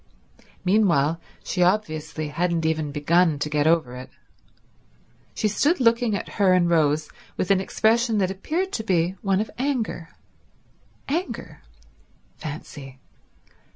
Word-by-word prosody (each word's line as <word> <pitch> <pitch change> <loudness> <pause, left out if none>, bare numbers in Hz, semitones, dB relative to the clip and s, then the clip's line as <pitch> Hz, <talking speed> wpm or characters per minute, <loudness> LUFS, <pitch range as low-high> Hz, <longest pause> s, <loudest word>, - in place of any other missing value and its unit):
Meanwhile 170 -6 +2 0.2
she 180 - -2
obviously 155 -5 0
hadn't 170 +1 -1
even 155 -2 0
begun 160 +2 +2
to 150 +1 -3
get 150 0 +2
over 160 -7 +2
it. 125 0 -9 1.3
She 215 - +1
stood 290 - +1
looking 230 -2 +3
at - - -4
her 190 -2 +5
and 180 -1 +3
Rose 155 -2 +2 0.3
with 185 - 0
an 190 -1 +4
expression 225 +3 +1
that 190 -2 +1
appeared 325 - -2
to 220 - -3
be 175 -4 +1
one 195 -1 +1
of 215 0 -3
anger. 245 - -2 1.0
Anger. 285 - -4 0.8
Fancy. 145 -3 -8
180 Hz, 125 wpm, -24 LUFS, 155-215 Hz, 1.3 s, her